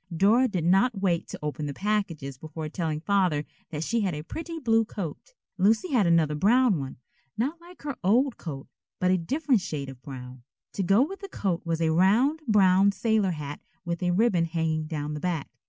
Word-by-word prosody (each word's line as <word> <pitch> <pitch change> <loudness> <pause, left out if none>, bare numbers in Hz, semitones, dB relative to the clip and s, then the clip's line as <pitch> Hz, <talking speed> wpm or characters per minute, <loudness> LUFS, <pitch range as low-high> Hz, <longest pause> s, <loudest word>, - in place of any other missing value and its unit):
Dora 225 +8 +5
did 185 -7 -2
not 195 +6 +3
wait 180 -4 0
to - - -7
open 150 0 -3
the 140 - -5
packages 185 -9 -2
before 155 +1 -6
telling 160 -2 -2
Father 180 -6 +1 0.2
that 155 -1 -4
she 230 +6 0
had 190 -6 -1
a 150 - -5
pretty 325 - -6
blue 225 -6 +3
coat. 210 - -7 0.2
Lucy 220 - +3
had 225 -9 +3
another 165 -3 +3
brown 215 - +3
one, 135 -1 -6 0.4
not 290 +9 -2
like 350 -1 -15
her 285 -3 -3
old 245 +7 +3
coat, 140 -5 -7 0.3
but 180 0 +2
a 185 - +4
different 265 - +1
shade 140 -5 -4
of 130 -2 -11
brown. 130 -2 -9 0.3
To - - -2
go 195 +6 +4
with 390 +3 -8
the 395 0 -8
coat 190 - -2
was 165 0 -1
a 160 -1 +2
round 215 - +3
brown 195 -2 +5
sailor 220 -2 +1
hat 145 -2 -6 0.3
with 170 0 -3
a 180 - +1
ribbon 180 -2 +3
hanging 160 -1 -1
down 150 -2 -3
the 150 - -4
back. 165 -3 -2
185 Hz, 200 wpm, -27 LUFS, 155-225 Hz, 0.4 s, Dora